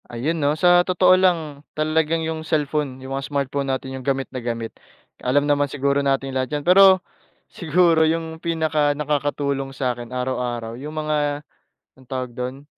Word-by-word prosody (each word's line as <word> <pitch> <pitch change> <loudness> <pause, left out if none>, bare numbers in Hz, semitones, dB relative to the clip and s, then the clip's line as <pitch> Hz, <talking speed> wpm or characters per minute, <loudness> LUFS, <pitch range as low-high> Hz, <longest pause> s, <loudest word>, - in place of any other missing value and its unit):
Ayun, 150 +8 -2
'no? 145 +2 +1
Sa 175 +1 +5
totoo 180 0 +4
lang 165 -6 +1 0.2
talagang 160 +1 +1
yung 160 0 -3
cellphone, 150 -3 -1
yung 135 - -5
mga 135 -1 -3
smartphone 140 -1 -2
natin 130 0 -3
yung 130 - -6
gamit 135 -1 0
na 130 - -4
gamit, 115 -1 -4 0.5
alam 140 +3 +2
naman 145 -1 +1
siguro 140 0 0
natin 135 -1 0
lahat 130 +2 -1
yan. 145 - -6
Pero 190 0 +6 0.5
siguro 170 0 +3
yung 160 0 -3
pinakanakakatulong 145 -3 0
sa'kin 120 -2 -3
araw-araw, 125 -2 -3
yung 150 +2 -7
mga 150 -1 -1 0.6
anong 130 - -20
tawag 130 -2 -4
dun, 125 +3 -6
145 Hz, 155 wpm, -22 LUFS, 130-160 Hz, 0.6 s, Pero